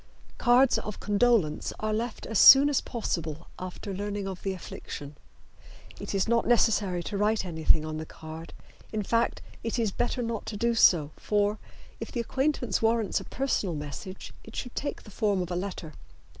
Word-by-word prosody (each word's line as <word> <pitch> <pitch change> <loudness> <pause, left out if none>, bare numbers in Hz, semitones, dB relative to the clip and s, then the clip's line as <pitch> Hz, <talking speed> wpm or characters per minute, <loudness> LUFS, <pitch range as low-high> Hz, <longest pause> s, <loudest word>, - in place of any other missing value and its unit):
Cards 250 +1 +5
of 210 - -6
condolence 205 -6 +2
are 215 0 -1
left 225 +1 -3
as 220 -2 0
soon 275 +2 +10
as 285 - +2
possible 165 - -4
after 185 +2 -6
learning 205 0 -3
of 190 -2 -6
the 195 - -2
affliction. 150 -5 -8 0.8
It - - -4
is 195 +1 +1
not 235 0 +2
necessary 210 -7 +2
to 200 - -4
write 210 -1 +1
anything 160 -2 +2
on 155 0 -4
the 155 - -5
card; 160 +1 -9 0.4
in 215 -1 -2
fact, 230 +4 0 0.2
it 230 +2 -2
is 225 -4 +1
better 240 +3 -1
not 230 -2 -4
to 210 - -4
do 235 +2 +1
so, 165 -9 +5
for, 205 0 0 0.4
if - - -6
the 245 - -3
acquaintance 265 +2 0
warrants 225 -2 +2
a - - -8
personal 230 -10 -1
message, 150 +6 -7
it 225 - -12
should 245 - -5
take 285 - -4
the 210 - -13
form 205 -1 +1
of 180 -1 -3
a - - -1
letter. 180 -4 -5
205 Hz, 180 wpm, -28 LUFS, 180-230 Hz, 0.8 s, soon